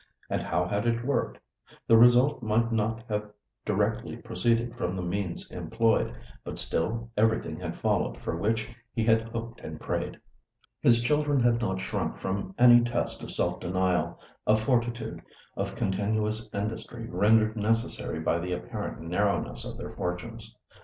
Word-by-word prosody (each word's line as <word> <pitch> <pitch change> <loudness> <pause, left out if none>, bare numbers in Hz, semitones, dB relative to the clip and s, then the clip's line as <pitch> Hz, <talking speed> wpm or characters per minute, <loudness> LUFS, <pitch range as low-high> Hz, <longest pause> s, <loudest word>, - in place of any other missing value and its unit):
And - - 0
how 90 - 0
had 105 +4 -1
it 120 0 0
worked? 140 -2 0 0.5
The 115 - +6
result 120 +4 +6
might 115 +1 +1
not 115 0 0
have 105 -1 -2 0.4
directly - - 0
proceeded 115 +5 0
from 95 -6 -2
the 90 - -3
means 90 0 -3
employed; 115 0 +1 0.3
but - - -6
still 115 +7 0
everything 110 -7 +1
had 85 -2 -5
followed - - 0
for - - -3
which 110 +5 0 0.3
he 115 - +1
had 110 0 +4
hoped 115 +1 -6
and - - -7
prayed. - - -3 0.6
His 115 0 +5
children 145 +1 +2
had 120 -1 +3
not 95 -4 -1
shrunk - - -2
from 100 - -3
any 120 -1 +8
test 120 0 -1
of - - -7
self - - +1
denial, 90 -2 0 0.3
of 110 +1 +5
fortitude, 120 -1 -1 0.3
of - - -3
continuous 105 +3 -1
industry 115 +2 -4
rendered 110 +3 +3
necessary 110 -6 0
by 85 +1 +1
the 90 +1 -3
apparent 90 - -5
narrowness 100 +5 -1
of - - -7
their - - -6
fortunes. 90 -1 -5
110 Hz, 155 wpm, -28 LUFS, 95-115 Hz, 0.6 s, any